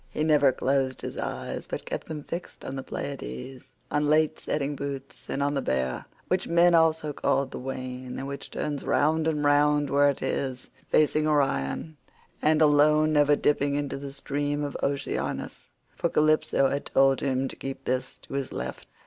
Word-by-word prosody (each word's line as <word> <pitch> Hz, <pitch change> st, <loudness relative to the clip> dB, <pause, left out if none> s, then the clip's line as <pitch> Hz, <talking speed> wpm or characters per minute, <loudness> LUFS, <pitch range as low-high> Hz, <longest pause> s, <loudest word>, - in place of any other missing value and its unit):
He 150 Hz, -, -2 dB
never 150 Hz, -3 st, +5 dB
closed 130 Hz, 0 st, 0 dB
his -, -, -5 dB
eyes, -, -, -4 dB
but -, -, -5 dB
kept -, -, -5 dB
them 150 Hz, -2 st, -5 dB
fixed 170 Hz, +4 st, -7 dB
on 135 Hz, -, -5 dB
the 135 Hz, -, -3 dB
Pleiads, 130 Hz, -, -6 dB, 0.3 s
on 150 Hz, 0 st, +1 dB
late 155 Hz, +1 st, +3 dB
setting 145 Hz, -1 st, -2 dB
Bootes, 140 Hz, -1 st, -6 dB
and 140 Hz, -, -1 dB
on 145 Hz, 0 st, +1 dB
the 140 Hz, -, 0 dB
Bear—which 65 Hz, -, -2 dB
men 170 Hz, +1 st, +5 dB
also 160 Hz, -2 st, +3 dB
call 140 Hz, 0 st, +1 dB
the 130 Hz, -, -8 dB
wain, 130 Hz, -1 st, -5 dB
and 135 Hz, -, -4 dB
which 140 Hz, 0 st, -6 dB
turns 145 Hz, -2 st, -3 dB
round 155 Hz, +2 st, +2 dB
and 150 Hz, -2 st, 0 dB
round 145 Hz, 0 st, +3 dB
where 145 Hz, +1 st, +5 dB
it 140 Hz, -, -3 dB
is, 130 Hz, -2 st, -3 dB, 0.2 s
facing 155 Hz, 0 st, +3 dB
Orion, 145 Hz, -, 0 dB, 0.4 s
and 155 Hz, +1 st, +4 dB
alone 150 Hz, +1 st, +4 dB
never 145 Hz, 0 st, +5 dB
dipping 145 Hz, -1 st, +1 dB
into 145 Hz, -1 st, -2 dB
the 140 Hz, 0 st, -6 dB
stream 145 Hz, +1 st, -2 dB
of 145 Hz, -, -4 dB
Oceanus—for 140 Hz, 0 st, -3 dB
Calypso 155 Hz, -2 st, +3 dB
had 140 Hz, -, -2 dB
told 135 Hz, 0 st, +4 dB
him 135 Hz, -1 st, 0 dB
to -, -, -8 dB
keep 135 Hz, 0 st, -7 dB
this 130 Hz, +1 st, -2 dB
to -, -, -11 dB
his 140 Hz, -1 st, -2 dB
left. 65 Hz, +1 st, -5 dB
145 Hz, 175 wpm, -27 LUFS, 135-150 Hz, 0.4 s, never